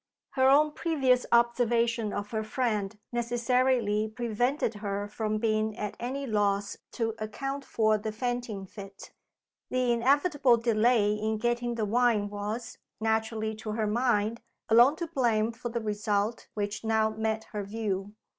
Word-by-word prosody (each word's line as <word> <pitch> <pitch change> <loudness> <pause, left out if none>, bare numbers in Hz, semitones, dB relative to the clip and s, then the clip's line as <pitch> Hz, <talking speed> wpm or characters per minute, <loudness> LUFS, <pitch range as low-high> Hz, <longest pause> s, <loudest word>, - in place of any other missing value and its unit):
Her 260 -1 +3
own 300 +2 +5
previous 270 -6 +1
observation 235 -2 +2
of 205 0 -4
her 220 -1 -1
friend 215 -3 -1
necessarily 240 -2 +1
prevented 240 +3 -1
her 200 -1 -2
from 215 0 -2
being 215 -1 0
at 210 -1 -4
any 265 +4 -3
loss 205 -3 0 0.2
to 225 -2 -1
account 270 +6 -4
for 215 -4 +1
the 215 +1 -4
fainting 240 -3 -3
fit. 195 0 -11 0.6
The 255 -1 +1
inevitable 270 +1 +3
delay 225 -2 +3
in 215 +1 -1
getting 240 +1 -1
the 220 -2 -1
wine 220 -2 +2
was 215 +4 -5 0.2
naturally 220 0 -1
to 215 -1 -5
her 220 0 0
mind 225 0 +1 0.3
alone 240 +6 +6
to 340 0 -3
blame 235 -7 +1
for 240 +1 -6
the 235 0 -3
result 210 +1 -1
which 205 +1 -3
now 220 -1 +2
met 220 0 -2
her 210 - -2
view. 205 -1 -3
225 Hz, 145 wpm, -28 LUFS, 215-245 Hz, 0.6 s, alone